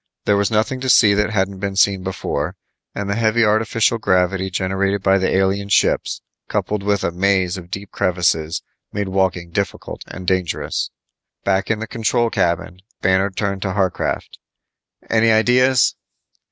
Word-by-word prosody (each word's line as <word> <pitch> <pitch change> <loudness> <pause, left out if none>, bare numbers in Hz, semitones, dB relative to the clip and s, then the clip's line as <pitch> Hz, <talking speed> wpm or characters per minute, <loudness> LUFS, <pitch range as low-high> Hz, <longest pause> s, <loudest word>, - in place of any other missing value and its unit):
There 105 - +3
was 100 0 +1
nothing 110 +4 0
to 130 0 -3
see 110 -4 +6
that 105 +1 +1
hadn't 95 -2 -1
been 100 0 -3
seen 95 -1 +3
before, 95 0 -3 0.4
and 100 - -3
the 100 - 0
heavy 115 +1 +2
artificial 110 +2 +2
gravity 95 -1 +1
generated 95 +2 -1
by 95 0 +4
the 95 - +1
alien 95 +1 +1
ships - - +1 0.2
coupled 105 -1 -2
with 100 -1 0
a - - 0
maze 95 0 +1
of 90 -2 -9
deep 100 +2 -7
crevices 85 -3 0 0.3
made 100 -1 -3
walking 90 -3 0
difficult 100 +3 -4
and 95 - -8
dangerous. 90 -2 -1 0.5
Back 95 0 0
in 115 - +1
the 110 - -4
control 115 +1 0
cabin, 85 +1 -1 0.2
Banner 95 +1 +3
turned 100 0 -3
to 95 -2 -2
Harcraft, 95 -3 -2 0.7
"Any 115 0 +3
ideas?" 125 +3 +4
100 Hz, 155 wpm, -20 LUFS, 95-105 Hz, 0.7 s, see